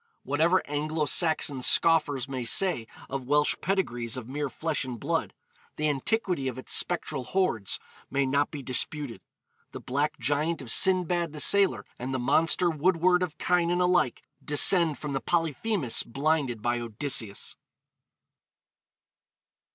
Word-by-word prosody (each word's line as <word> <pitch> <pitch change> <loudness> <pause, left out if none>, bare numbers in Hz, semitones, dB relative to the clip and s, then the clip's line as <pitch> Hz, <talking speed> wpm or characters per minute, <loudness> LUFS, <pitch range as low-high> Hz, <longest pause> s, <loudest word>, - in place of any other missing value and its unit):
Whatever 165 +6 +1
Anglo 150 +2 -2
Saxon 145 -3 +1
scoffers 145 -3 +3
may 130 -2 -4
say 120 -1 +2 0.2
of 135 -2 -6
Welsh 150 +1 +2
pedigrees 120 - -2
of 120 -3 -7
mere 145 +2 -3
flesh 155 +4 -2
and 125 -3 -7
blood, - - -2 0.4
the 155 - -1
antiquity 150 - -1
of 130 - -4
its 130 - -5
spectral 155 -6 -1
hordes 120 - -1 0.3
may 140 0 0
not 140 +2 0
be 145 -2 -8
disputed. 130 0 -2 0.5
The - - -7
black 145 +4 -2
giant 150 +3 -1
of 125 -4 -5
Sindbad 175 -2 +3
the 150 - -6
Sailor 200 +5 +4
and 130 +2 -4
the - - 0
monster 165 +7 +2
woodward 175 +2 +2
of 180 -4 -3
Cynan 175 0 +1
alike 180 -8 +1 0.2
descend 155 +2 +4
from 150 -2 -6
the 135 - -2
Polyphemus 165 - -1
blinded 135 -4 -1
by 120 0 0
Odysseus. 115 -2 -2
150 Hz, 135 wpm, -27 LUFS, 130-170 Hz, 0.5 s, Sailor